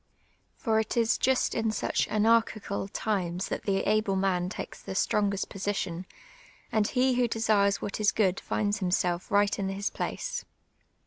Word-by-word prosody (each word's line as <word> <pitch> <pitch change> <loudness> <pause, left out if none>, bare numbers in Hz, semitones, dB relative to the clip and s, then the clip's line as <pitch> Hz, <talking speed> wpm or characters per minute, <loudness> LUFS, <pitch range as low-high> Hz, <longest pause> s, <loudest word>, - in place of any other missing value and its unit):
For 225 -6 +1
it 220 +2 -2
is 230 -1 +2
just 265 0 +2
in 225 -1 0
such 215 - 0
anarchical 215 -2 +1
times 190 -3 -2
that - - -4
the 195 -1 +1
able 210 -1 +2
man 185 -2 +1
tiikes - - -7
the 190 - -6
strongest 200 -1 +1
position, 185 -3 -3 0.6
and 215 -2 +2
he 255 +1 +2
who 245 -1 +2
desires 215 -3 +2
what 200 - -4
is 210 -1 +4
good 195 -3 +1
finds 210 +1 -1
himself 180 -2 0
right 205 0 +2
in 195 -1 -1
his 195 +1 -2
place. - - -3
205 Hz, 155 wpm, -28 LUFS, 195-220 Hz, 0.6 s, is